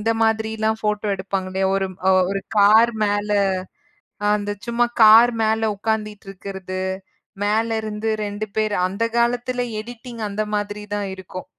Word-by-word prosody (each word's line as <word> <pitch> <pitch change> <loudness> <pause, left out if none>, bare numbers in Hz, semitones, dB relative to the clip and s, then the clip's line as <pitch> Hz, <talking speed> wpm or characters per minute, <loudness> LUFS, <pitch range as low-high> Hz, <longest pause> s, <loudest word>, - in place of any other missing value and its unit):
இந்த 225 +2 0
மாதிரிலாம் 220 0 0
ஃபோட்டோ 210 0 -1
எடுப்பாங்க 190 0 -3
இல்லயா? 190 0 0
ஒரு 195 0 0 0.4
ஒரு 195 0 -1 0.2
கார் 220 +3 +6
மேல 205 0 -1 1.0
அந்தச் 205 -1 -4
சும்மா 240 0 +2 0.2
கார் 225 +3 +8
மேல 220 0 +1
உக்காந்திட்டு 210 -1 -3
இருக்கறது, 190 -1 -6 0.6
மேல 220 +2 +1
இருந்து 215 0 -4 0.2
2 205 +1 -4
பேர் 215 -1 +1
அந்தக் 225 +5 -2
காலத்துல 245 +1 +1 0.2
எடிட்டிங் 235 0 -9
அந்த 205 +1 -2
மாதிரி 205 0 -3
தான் 205 -1 -2
இருக்கும். 185 -1 -9
210 Hz, 135 wpm, -21 LUFS, 200-225 Hz, 1.0 s, கார்